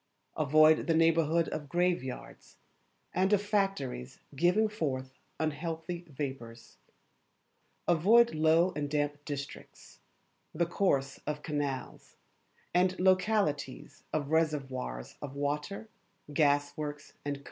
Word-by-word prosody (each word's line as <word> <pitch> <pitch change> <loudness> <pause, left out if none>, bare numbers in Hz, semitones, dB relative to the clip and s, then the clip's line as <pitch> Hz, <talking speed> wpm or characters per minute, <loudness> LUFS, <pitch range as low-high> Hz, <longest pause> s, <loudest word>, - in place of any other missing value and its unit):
Avoid 155 +2 +5
the 165 - +3
neighbourhood 165 0 +3
of 145 -2 -5
graveyards, 175 -7 -2 0.6
and 190 +3 +2
of 205 - +5
factories 195 - -1 0.2
giving 180 +9 +3
forth 130 -10 -4 0.2
unhealthy 165 +3 -3
vapours. 130 -5 -7 1.1
Avoid 215 +8 +5
low 160 +3 +3
and 145 -1 -2
damp 145 0 -1
districts, 140 -1 -8 0.6
the 170 - +2
course 140 -7 0
of 150 0 -3
canals, 145 -4 -4 0.6
and 180 +1 +2
localities 185 -7 +1
of 150 -1 -2
reservoirs 135 - -1
of 140 -2 -7
water, 145 +9 -3 0.5
gas 145 -1 +2
works, 145 -1 -6
&c. 145 0 -2
155 Hz, 105 wpm, -31 LUFS, 140-175 Hz, 1.1 s, Avoid